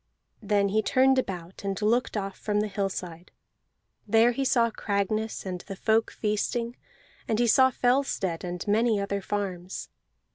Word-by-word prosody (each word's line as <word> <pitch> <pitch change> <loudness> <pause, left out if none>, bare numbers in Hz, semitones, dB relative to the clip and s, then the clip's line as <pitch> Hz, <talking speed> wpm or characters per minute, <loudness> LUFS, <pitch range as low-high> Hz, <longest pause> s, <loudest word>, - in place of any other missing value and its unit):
Then 200 -1 +2
he 215 +2 +2
turned 260 +4 +3
about, 180 -6 -5
and 195 -1 -2
looked 225 +2 +1
off 195 -1 -3
from 210 -1 -1
the 215 - -1
hillside. 185 -4 -4 0.8
There 225 +3 +5
he 270 +3 -2
saw 235 -3 +3
Cragness, 215 +1 -2
and 180 -2 -4
the 195 - -8
folk 220 +3 +2
feasting; 230 +3 -2 0.5
and 220 - +1
he 240 - +3
saw 260 +3 +5
Fellstead 245 -9 0
and 180 +2 -5
many 220 +1 +3
other 200 0 -2
farms. 190 -3 -4
210 Hz, 150 wpm, -27 LUFS, 195-230 Hz, 0.8 s, There